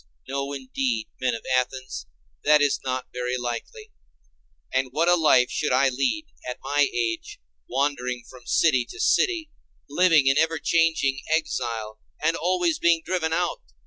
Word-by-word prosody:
No, 140 +1 -3
indeed, 130 -4 -2
men 130 -2 0
of 115 - -9
Athens, 125 - -2 0.4
that 150 0 +6
is 145 -1 +2
not 130 -1 -3
very 125 0 -2
likely. 125 - -6 0.8
And 130 0 +1
what 160 +5 +1
a 175 - +6
life 150 -7 +4
should 150 - -1
I 130 +2 +4
lead, 140 - -1 0.2
at 125 - -5
my 145 +1 +2
age, 115 -2 -3 0.3
wandering 125 -2 -1
from 125 -2 -15
city 135 -7 +3
to - - -10
city, 335 -5 +2 0.4
living 160 -1 +4
in 135 +2 +4
ever 160 0 +2
changing 160 -6 +1 0.2
exile, 115 -8 -3 0.2
and 165 +2 +1
always 175 -1 0
being 170 -1 +3
driven 175 -4 -1
out! 175 +1 -1
140 Hz, 150 wpm, -25 LUFS, 125-165 Hz, 0.8 s, that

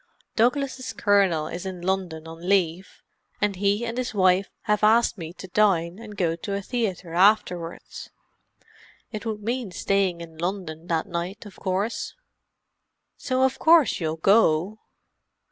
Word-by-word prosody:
"Douglas's 260 +2 0
Colonel 195 -7 +2
is 175 +3 -6
in 185 -2 -6
London 180 -4 -2
on 165 +3 -7
leave, 185 -2 0 0.4
and 205 -1 0
he 205 +4 +1
and 235 +2 -3
his 250 -3 -3
wife 185 0 +3
have 210 -1 0
asked 225 +3 +4
me 165 -5 -7
to 190 - -10
dine 180 -3 +2
and 210 -3 -10
go 165 -3 +1
to 200 +4 -4
a 200 - -2
theatre 190 -8 -3
afterwards. 180 -3 +1 1.0
It 215 +1 -5
would 210 -2 -4
mean 240 0 -2
staying 185 -1 0
in 160 -1 -11
London 175 -2 -4
that 165 -2 0
night, 175 +4 -5
of 205 - -12
course." 195 +5 -2 1.0
"So 260 0 0
of 265 0 +1
course 320 -6 +5
you'll 160 -2 -1
go?" 195 +2 +3
195 Hz, 145 wpm, -25 LUFS, 170-215 Hz, 1.0 s, course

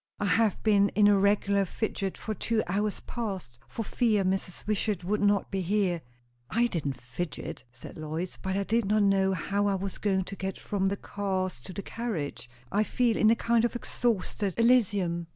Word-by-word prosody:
"I 205 - 0
have 210 +1 +2
been 205 -2 +4
in 210 -1 +6
a 205 - +6
regular 200 0 +3
fidget 195 -1 -3
for 220 - -4
two 220 +1 0
hours 205 +3 -1
past, 190 - -5
for 225 - -4
fear 215 -3 +1
Mrs. 190 -1 -2
Wishart 210 -3 0
would 205 +4 0
not 205 -1 +2
be 195 -1 -1
here." 185 -2 +1 0.5
"I 235 +2 +2
didn't 145 - -2
fidget," 130 +7 -6
said 120 +5 -11
Lois, 160 +4 -4
"but 190 0 -1
I 200 - +1
did 225 +2 +1
not 210 +1 +3
know 195 -1 +3
how 200 +3 0
I 200 - +2
was 195 0 -4
going 190 -2 +1
to 195 - -7
get 190 0 -4
from 195 -2 -1
the 200 +1 -1
cars 190 -9 -3
to 160 - -9
the 195 +2 -6
carriage. 155 - -4 0.2
I 205 - +2
feel 235 0 +1
in 215 - +4
a 230 - +5
kind 230 0 +2
of 240 - 0
exhausted 210 -5 -1
Elysium!" 200 -8 +3
200 Hz, 190 wpm, -28 LUFS, 185-215 Hz, 0.5 s, in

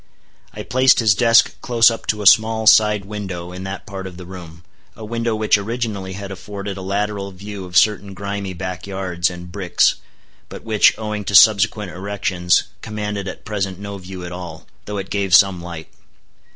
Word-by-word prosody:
I - - -8
placed 130 +2 +4
his 110 -4 +4
desk 115 +4 +3
close 115 -1 +4
up 115 - -7
to 105 -1 -1
a - - -7
small 110 +3 +5
side 105 -2 +5
window 95 -4 -6
in 90 +1 -8
that 95 0 -6
part 95 -2 -7
of 90 -2 -11
the 90 - -9
room, 85 -2 -11 0.3
a 110 - -9
window 115 0 -2
which 110 -1 +2
originally 105 -3 -4
had 100 +1 -7
afforded 100 +1 -7
a 95 - -8
lateral 100 +1 -2
view 100 0 -8
of 90 -1 -2
certain 100 -2 +2
grimy 100 0 -5
back 90 +1 -6
yards 95 -3 -1
and 90 0 -10
bricks, 90 -2 +1 0.5
but - - -10
which, 110 -2 +3
owing 105 -1 -4
to 100 - -1
subsequent 105 -1 +5
erections, 95 -2 0 0.2
commanded 105 -2 -4
at 95 - -8
present 100 -4 -3
no 100 0 -7
view 90 -1 -8
at 90 - -7
all, 90 -3 -8 0.2
though 105 0 -5
it 95 0 -6
gave 100 -3 +2
some 95 -2 +4
light. 85 -2 -8
100 Hz, 185 wpm, -20 LUFS, 95-105 Hz, 0.5 s, small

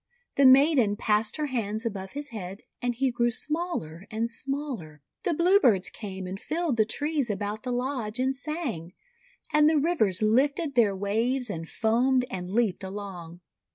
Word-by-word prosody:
The 275 -1 +6
maiden 260 -5 +5
passed 210 +3 +1
her 305 - -1
hands 225 -4 -2
above 195 -4 -4
his 290 +1 -5
head, 200 -1 -7 0.2
and 245 -1 -1
he 265 +1 +1
grew 240 0 +1
smaller 235 - -3
and 225 +2 -1
smaller. 235 - -5 0.2
The 335 - 0
Bluebirds 340 - +4
came 190 -3 -7
and 190 +2 -5
filled 320 -3 -1
the 220 - +4
trees 290 +2 -1
about 205 +1 -3
the 250 - -4
lodge, 245 -3 -2
and 260 +1 0
sang; 265 - -4 0.6
and 300 0 +6
the 315 0 +4
rivers 275 - +2
lifted 280 +7 +2
their 220 -6 +3
waves 225 +5 0
and 165 -3 -6
foamed 250 +3 +2
and 180 -1 -5
leaped 215 -3 +1
along. 190 -3 -7
235 Hz, 160 wpm, -27 LUFS, 200-275 Hz, 0.6 s, The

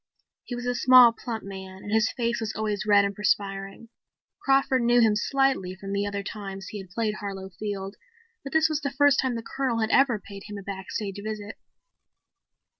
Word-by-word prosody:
He 245 - -5
was 240 0 -6
a 245 - 0
small, 250 -1 +7
plump 230 -2 -6
man 190 -1 -9
and 205 - -7
his 220 0 +3
face 235 -1 -1
was 220 -1 -4
always 215 -1 -2
red 205 -1 +6
and 200 - -2
perspiring. 195 +1 -2 0.5
Crawford 270 -1 +2
knew 240 +1 +4
him 220 -3 +4
slightly 265 -5 +1
from 195 +1 -7
the 200 0 0
other 200 0 -3
two - - -5
times 195 -2 -7
he 210 - -6
had 190 -2 -10
played 215 +2 -1
Harlow 195 -2 -6
Field, 195 0 -5 0.5
but 275 - -7
this 315 0 +4
was 310 -1 -2
the 280 - -1
first 285 0 +3
time 260 -2 0
the 230 - -5
Colonel 260 -1 -2
had 220 0 0
ever 270 -5 +4
paid 200 -1 -11
him 210 -1 -7
a 200 - -8
backstage 195 +1 -5
visit. 215 -1 -6
215 Hz, 200 wpm, -26 LUFS, 200-245 Hz, 0.5 s, small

